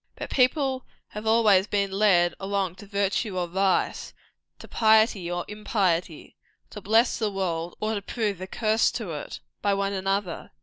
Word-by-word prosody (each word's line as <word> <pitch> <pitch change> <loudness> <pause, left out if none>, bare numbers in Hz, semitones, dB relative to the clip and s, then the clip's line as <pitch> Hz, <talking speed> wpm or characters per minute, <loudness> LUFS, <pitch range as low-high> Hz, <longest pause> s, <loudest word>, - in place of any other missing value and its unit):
But - - -7
people 265 0 +1 0.3
have 210 +1 -7
always 215 -4 +4
been 200 -2 0
led 190 -4 +3
along 195 -2 -2
to 205 - -12
virtue 200 0 -1
or 180 - 0
vice, 190 +2 0 0.4
to - - -12
piety 220 -5 +3
or 175 0 -3
impiety, 190 -6 -2 0.4
to 210 - -8
bless 225 +5 +2
the 220 -2 0
world 175 -4 -3
or 215 +1 -1
to 205 - -3
prove 205 -3 -3
a 185 - -5
curse 220 +2 +1
to 215 -8 -4
it, 150 -2 -7 0.2
by 200 -1 +1
one 200 0 -1
another. 195 -1 -2
200 Hz, 165 wpm, -25 LUFS, 185-220 Hz, 0.4 s, always